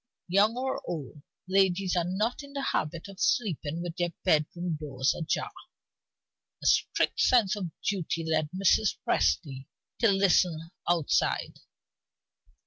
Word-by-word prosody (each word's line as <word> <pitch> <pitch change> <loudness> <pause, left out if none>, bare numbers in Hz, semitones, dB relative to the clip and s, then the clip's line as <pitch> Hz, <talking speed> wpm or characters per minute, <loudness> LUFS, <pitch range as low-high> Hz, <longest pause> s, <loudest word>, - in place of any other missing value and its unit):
Young 205 +6 +3
or 265 +1 -2
old, 150 -3 -6 0.3
ladies 190 -1 +2
are 175 - +2
not 205 +9 -1
in 280 -1 -12
the 280 -1 -3
habit 165 - -2
of 195 -1 -12
sleeping 170 - 0
with 175 -1 -6
their 175 -1 0
bedroom 165 +2 +1
doors 135 -3 0
ajar. 160 - -2 1.1
A - - -7
strict - - +2
sense 230 -6 +4
of 190 -4 -4 0.2
duty 170 -4 -1
led 155 -1 +1
Mrs. 195 +3 +2
Presty 130 - 0 0.3
to 230 -3 +4
listen 180 -4 +2 0.2
outside. 170 -4 +1
175 Hz, 130 wpm, -28 LUFS, 160-195 Hz, 1.1 s, sense